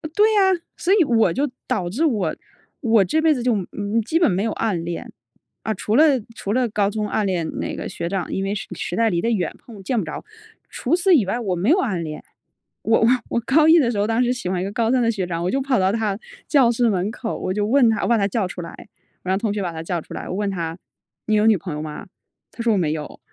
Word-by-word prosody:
对 430 +1 +4
呀。 420 - +4 0.4
所 360 - 0
以 405 -4 +5
我 230 - +3
就 280 +9 0 0.2
导 180 -4 -1
致 260 - 0
我， 225 -10 0 0.4
我 225 -6 +4
这 315 +11 +1
辈 315 -1 +4
子 250 -4 -3
就， 250 -1 +2
嗯， 190 -4 -3
嗯， 210 +2 -1
基 315 +9 0
本 335 - +3
没 185 +3 0
有 225 - -1
暗 195 -7 -1
恋。 170 0 -5 0.5
啊， 220 - -2
除 215 - -1
了 300 - +7 0.3
除 200 - -3
了 250 0 +2
高 205 -1 +1
中 210 0 -2
暗 210 0 0
恋 175 -4 -1
那 - - -3
个 - - -5
学 170 - -4
长， 190 -3 -3
因 190 - -1
为 195 +1 -1
实 195 - -5
实 175 - -4
在 225 +1 +2
离 170 - 0
得 230 - 0
远， 185 -8 -1
碰 215 -5 -13
见 235 +3 0
不 - - -1
着。 - - -7 0.4
除 280 +8 0
此 360 +1 +3
以 250 - +4
外， 215 +6 -2
我 195 -6 -1
没 180 +7 0
有 335 - +5
暗 190 - -1
恋。 155 -1 -7 0.6
我 225 - +3
我 225 - +4 0.2
我 - - 0
高 300 +6 +3
一 325 +2 +7
的 255 -7 +3
时 205 - -2
候， 205 - +1
当 230 +2 +2
时 245 - +1
喜 245 -8 -4
欢 185 -1 -1
一 - - -2
个 200 - -4
高 225 +2 0
三 255 -1 +3
的 230 - +2
学 190 -5 -3
长， 170 -1 -3
我 180 - 0
就 275 - 0
跑 265 -2 +1
到 190 0 +2
他 210 -2 -1 0.3
教 265 -6 +4
室 240 0 +2
门 195 +1 0
口， 230 -1 -4
我 185 - -2
就 210 +1 -1
问 250 +1 +4
他 215 -2 -1
我 - - 0
把 235 - +3
他 200 -2 +1
叫 200 -2 -1
出 180 - -7
来， 170 - -7 0.5
我 185 - -5
让 190 - +2
同 205 -1 -1
学 205 - -2
把 175 - -2
他 160 -1 -6
叫 170 0 -2
出 - - -10
来， - - -6
我 185 - -4
问 205 0 -1
他： 165 -4 -3 0.5
“你 215 - +2
有 210 - +3
女 220 -1 +6
朋 170 -3 -6
友 150 - -4
吗？” 155 +5 -7 0.4
他 230 - -6
说： 230 -2 +3
“我 - - +2
没 165 -5 +1
有。” 155 -1 -7
210 Hz, 300 characters per minute, -22 LUFS, 185-240 Hz, 0.6 s, 了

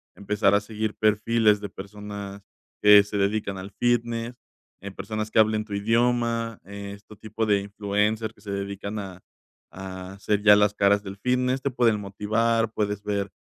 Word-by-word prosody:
empezar 100 0 +1
a 100 - +4
seguir 110 0 -3
perfiles 110 0 +3
de 100 -2 -6
personas 100 0 -8 0.4
que 105 0 +9
se 105 0 -5
dedican 100 0 -1
al 95 +2 -8
fitness, 120 +1 -1 0.5
eh, 100 - -7
personas 110 +2 -5
que - - +3
hablen 110 0 +3
tu 105 - -8
idioma, 115 +1 0
este 100 +1 -9
tipo 110 +1 -4
de 100 -1 +3
influencers 105 +2 -1
que - - -24
se 100 -1 -7
dedican 100 +1 -4
a 95 -2 -8 0.5
a 95 0 -8
ser 105 0 0
ya 105 -1 +8
las 105 0 +3
caras 100 0 +3
del 100 0 -8
fitness, 125 +3 0
te 140 - 0
pueden 115 -4 +2
motivar, 110 +3 0
puedes 105 -2 -2
ver, 100 -2 -2
105 Hz, 165 wpm, -25 LUFS, 100-110 Hz, 0.5 s, que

